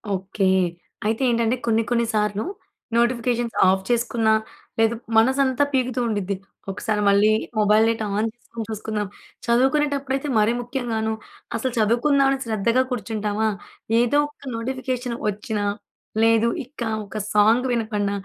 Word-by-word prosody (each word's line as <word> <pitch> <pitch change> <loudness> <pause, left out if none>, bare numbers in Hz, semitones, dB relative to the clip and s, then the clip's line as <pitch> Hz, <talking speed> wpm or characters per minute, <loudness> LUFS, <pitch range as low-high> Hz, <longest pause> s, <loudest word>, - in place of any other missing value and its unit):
Okay. 190 +1 -1 0.6
అయితే 220 +4 0
ఏంటంటే, 235 0 +2
కొన్ని 225 0 +3
కొన్ని 235 -1 +2
సార్లు 210 -1 0 0.5
నోటిఫికేషన్స్ 240 0 +1
ఆఫ్ 190 0 +1
చేసుకున్న, 235 -1 +1 0.5
లేదు 225 +1 +3 0.2
మనసంతా 260 +3 +3
పీకుతూ 255 -1 0
ఉండిద్ది. 205 -3 -1 0.4
ఒకసారి 210 +2 -2
మళ్ళీ 200 +2 +5 0.3
మొబైల్ 210 +1 +5
డేటా 225 -1 -1
ఆన్ 215 +2 +1
చేసుకొని 230 -1 -8
చూసుకుందాం. 215 -1 -3 0.4
చదువుకునేటప్పుడైతే 270 +2 +1
మరీ 215 +2 +3
ముఖ్యంగాను. 235 -3 -2 0.4
అసలు 260 +3 -1
చదువుకుందాం 245 +6 +3
అని 270 - 0
శ్రద్ధగా 230 +3 +2
కూర్చుంటామా, 220 -2 -1 0.5
ఏదో 240 +4 +3
ఒక 285 -1 -15
నోటిఫికేషన్ 250 0 -3
వచ్చిన, 210 +1 -2 0.6
లేదు 225 0 +4 0.2
ఇక 255 0 -15 0.2
ఒక 200 - -7 0.2
సాంగ్ 220 +4 +4
వినబడిన, 215 -4 -1
230 Hz, 120 wpm, -23 LUFS, 215-250 Hz, 0.6 s, మళ్ళీ